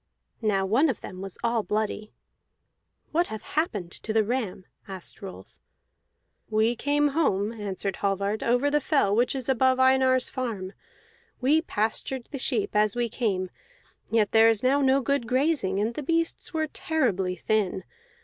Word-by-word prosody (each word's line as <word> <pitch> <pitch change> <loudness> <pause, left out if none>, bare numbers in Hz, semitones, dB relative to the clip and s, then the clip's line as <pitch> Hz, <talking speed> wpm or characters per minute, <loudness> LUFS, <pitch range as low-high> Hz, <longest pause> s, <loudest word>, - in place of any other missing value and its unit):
Now 200 -3 +1
one 260 +11 +3
of 250 - -3
them 185 - -8
was 195 -1 -7
all 235 -1 +1
bloody. 210 +1 -2 1.0
"What 340 +3 +2
hath 220 -1 -7
happened 210 - -2
to 215 - -5
the 220 0 +3
ram?" 215 -5 -3 0.2
asked 190 +2 -7
Rolf. 195 -2 -10 0.9
"We 220 +2 +2
came 290 +3 +1
home," 225 -9 +1
answered 200 -3 -4
Hallvard, 200 +2 -1
"over 245 +5 +2
the 295 0 +2
fell 270 -9 +2
which 245 +4 +2
is 260 -3 -4
above 260 0 +3
Einar's 260 0 +4
farm; 215 -7 -4 0.7
we 290 +5 +3
pastured 235 -1 -2
the 275 - -5
sheep 240 -5 0
as 210 0 +3
we 240 -1 0
came, 195 -6 -1 0.6
yet 220 -3 +2
there 225 0 +6
is 225 0 +1
now 275 +3 +3
no 270 0 +3
good 275 -1 0
grazing, 255 -7 +1
and 220 +3 0
the 300 - -4
beasts 330 +3 -1
were 315 -2 0
terribly 230 - -1
thin. 200 -2 -1
230 Hz, 160 wpm, -26 LUFS, 205-265 Hz, 1.0 s, there